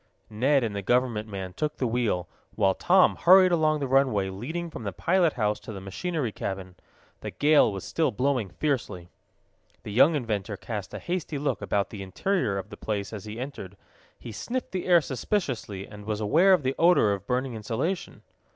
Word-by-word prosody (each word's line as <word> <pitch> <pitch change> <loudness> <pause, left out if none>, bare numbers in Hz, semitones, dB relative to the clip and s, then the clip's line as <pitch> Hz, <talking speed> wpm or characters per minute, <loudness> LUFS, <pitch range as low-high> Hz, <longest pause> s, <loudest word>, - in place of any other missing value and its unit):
Ned 130 +5 +2
and 110 -3 -2
the 100 - -2
government 115 0 +1
man 95 -2 -6
took 150 +9 -3
the 130 - -1
wheel, 115 -7 0 0.3
while 95 -1 +3
Tom 185 - +4
hurried 185 +1 +6
along 155 -2 +2
the 140 - -1
runway 125 -8 +2
leading 160 - -5
from - - -7
the 100 -3 -3
pilot 170 - +2
house 105 -3 0
to - - -9
the 100 - -7
machinery 130 - -3
cabin. 95 -2 -5 0.5
The - - -6
gale 150 -6 +4
was 95 -2 -6
still 160 -3 0
blowing 125 -2 0
fiercely. 115 - -3 0.7
The 105 - -7
young 140 +9 +5
inventor 105 -6 -2
cast 105 -3 -6
a - - -3
hasty 175 -4 -3
look 140 -6 -2
about 100 -1 -1
the 105 - -7
interior 100 - -1
of 95 +1 -6
the 105 - -9
place 105 -1 -4
as 105 -2 -7
he 110 +2 -7
entered. 110 -8 -7 0.4
He 115 - -9
sniffed 240 - -4
the 185 -1 -3
air 175 -2 +6
suspiciously, 130 - -3
and 105 -1 -11
was 105 -1 -2
aware 165 - +4
of 175 -6 +2
the 130 +1 0
odor 170 - +5
of 100 0 -6
burning 130 0 -1
insulation. 115 - -3
120 Hz, 190 wpm, -26 LUFS, 100-155 Hz, 0.7 s, hurried